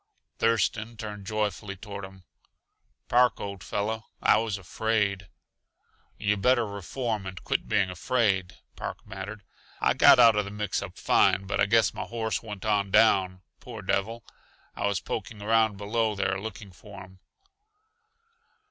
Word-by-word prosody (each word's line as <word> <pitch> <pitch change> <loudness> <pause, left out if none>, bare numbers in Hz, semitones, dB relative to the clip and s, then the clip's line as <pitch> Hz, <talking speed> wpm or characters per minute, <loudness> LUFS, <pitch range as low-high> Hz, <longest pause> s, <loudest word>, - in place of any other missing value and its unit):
Thurston 115 0 +1
turned 105 -2 -7
joyfully 105 -2 -2
toward 100 0 -8
him. 95 -1 -14 0.8
"Park, 125 0 +3
old 100 -1 -6
fellow, 110 +1 -3
I - - +4
was 110 -2 -2
afraid." 100 0 -1 0.9
"Yuh 105 0 0
better 120 +3 +3
reform 105 +1 -4
and 95 -1 -8
quit - - -1
being 100 -3 +1
afraid," 95 -2 0 0.2
Park - - -5
bantered. 100 +1 -7 0.4
"I - - +3
got - - +7
out 115 -3 +7
uh 105 - +3
the 100 - -6
mix 105 -1 -2
up 95 -3 -8
fine, 95 - +3
but 100 - -2
I - - +4
guess 115 0 +3
my - - -5
horse 115 -1 -2
went 105 -3 -8
on 105 -2 +1
down 95 -3 +3 0.2
poor 115 -4 -9
devil. 105 +5 -1 0.5
I - - -1
was 100 -2 0
poking 110 0 -5
around 110 0 +2
below 110 +2 0
there 95 -1 -1
looking 105 -2 -8
for 100 +2 -12
him." 95 0 -17
105 Hz, 150 wpm, -27 LUFS, 95-110 Hz, 0.9 s, got